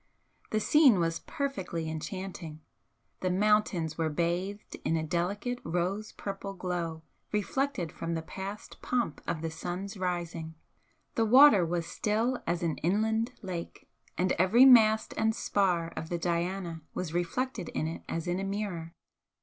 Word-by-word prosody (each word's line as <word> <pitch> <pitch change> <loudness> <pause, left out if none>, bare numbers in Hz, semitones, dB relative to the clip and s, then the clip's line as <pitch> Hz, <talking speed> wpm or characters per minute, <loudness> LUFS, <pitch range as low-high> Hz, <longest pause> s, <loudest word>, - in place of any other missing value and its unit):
The 215 - +1
scene 265 - +5
was 165 -1 0
perfectly 190 - -3
enchanting; 160 -1 -6 0.6
the 185 - 0
mountains 185 -5 +2
were 160 -1 +1
bathed 175 +6 -2
in 165 - +1
a 160 - -1
delicate 200 +9 -1
rose 180 +6 -1
purple 195 0 -6
glow 170 -3 -3 0.3
reflected 210 - -1
from 165 0 -3
the 160 - -3
past 195 +5 -7
pomp 240 -11 -1
of 160 -1 -2
the 165 - -2
sun's 185 +5 -5
rising, 170 -3 -3 0.6
the 225 - +2
water 250 -4 +8
was 170 0 -1
still 225 +7 0
as 170 +1 0
an 165 -2 -1
inland 220 +6 +1
lake, 180 -3 -6 0.3
and 180 +1 +2
every 215 +8 +6
mast 220 -4 +6
and 220 0 +2
spar 180 -7 +1
of 160 - -5
the 175 - -1
'Diana' 170 0 -2
was 170 -3 -3
reflected 185 +3 -2
in - - -2
it 160 +1 -4
as 165 -1 -2
in 175 +1 0
a - - -2
mirror. 195 -5 -3
180 Hz, 150 wpm, -30 LUFS, 165-210 Hz, 0.6 s, water